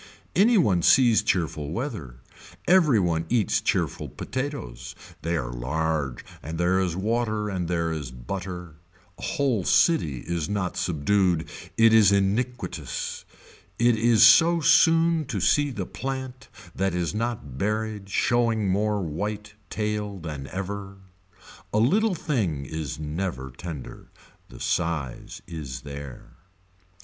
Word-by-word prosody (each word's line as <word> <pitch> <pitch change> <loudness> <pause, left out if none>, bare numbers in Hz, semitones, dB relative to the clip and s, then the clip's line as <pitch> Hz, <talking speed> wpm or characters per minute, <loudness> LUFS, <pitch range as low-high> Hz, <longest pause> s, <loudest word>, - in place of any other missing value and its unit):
Any 225 +4 +5
one 95 - +3
sees 120 +3 +5
cheerful 85 -7 -1
weather, 85 - -5 0.5
every 165 - +5
one 85 -3 0
eats 115 -4 +2
cheerful - - -1
potatoes, 65 - -5 0.3
they 85 +1 -1
are - - -4
large 70 +1 -2 0.2
and 80 +2 -6
there 90 +2 +2
is 90 -3 0
water 110 +1 -1
and 90 -3 -2
there 85 -1 0
is 75 -5 -4
butter, 90 +6 -7 0.4
a - - -11
whole 130 -9 0
city 80 - +3
is 85 0 -3
not 100 -3 -2
subdued 90 +1 +1 0.3
it 115 0 +6
is 105 -3 +6
iniquitous, 105 +6 -2 0.5
it 120 0 +4
is 115 0 +5
so 165 +9 +6
soon 165 +1 +4
to 120 -7 -3
see 145 - +3
the 125 - -4
plant 130 -1 -6 0.3
that 95 -1 -1
is 85 0 -1
not 105 - -4
buried 105 -1 -2
showing 115 -1 +1
more 105 +1 +1
white 105 +6 -4 0.2
tail 105 -2 -2
than 75 -5 -6
ever. 100 +1 -5 0.7
A - - 0
little 190 - +3
thing 95 - -1
is 80 -2 -5
never 75 -3 -4
tender. 75 0 -8 0.4
The - - -12
size 80 -7 -2
is 70 -7 -7
there. 70 -2 -9
95 Hz, 130 wpm, -25 LUFS, 80-115 Hz, 0.7 s, it